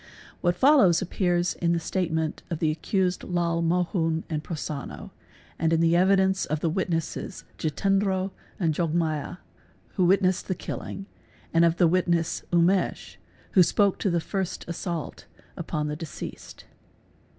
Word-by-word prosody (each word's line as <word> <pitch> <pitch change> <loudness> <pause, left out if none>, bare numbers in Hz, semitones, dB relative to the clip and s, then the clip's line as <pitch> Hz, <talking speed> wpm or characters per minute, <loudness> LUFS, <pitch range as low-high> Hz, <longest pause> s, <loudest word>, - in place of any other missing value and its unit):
What 175 0 +2
followed 260 - +5
appears 175 -1 0
in 170 -1 0
the - - +1
S 165 - -5
statements 160 -4 -1
of 165 - -2
the 155 -1 +1
accused 180 +3 -1
Lal 170 -2 0
Mohun 165 -1 0
and 155 -1 -2
Prosonno, 150 -4 -6 0.5
and 160 0 +1
in 165 - +3
the 165 0 +3
evidence 190 +1 +3
"of 155 0 -1
the 165 +1 0
witnesses 170 +1 -3 0.2
Jitendro 190 +3 0 0.3
and 165 -4 +1
Jogmaya, 160 -2 -1 0.5
who 185 - +1
witnessed 185 0 +2
the 185 - -1
killing, 195 +3 -6 0.5
and 165 0 +5
of 170 0 +3
the 175 - +5
witness 170 -1 +1
Umesh, 175 - +1 0.3
who 185 - +6
spoke 195 +3 +3
to 200 - +1
the 170 -1 +1
first 190 +2 -3
assault 170 -1 -5 0.3
upon 155 -3 -3
the 150 - -3
deceased. 160 -1 -8
170 Hz, 145 wpm, -26 LUFS, 165-185 Hz, 0.5 s, who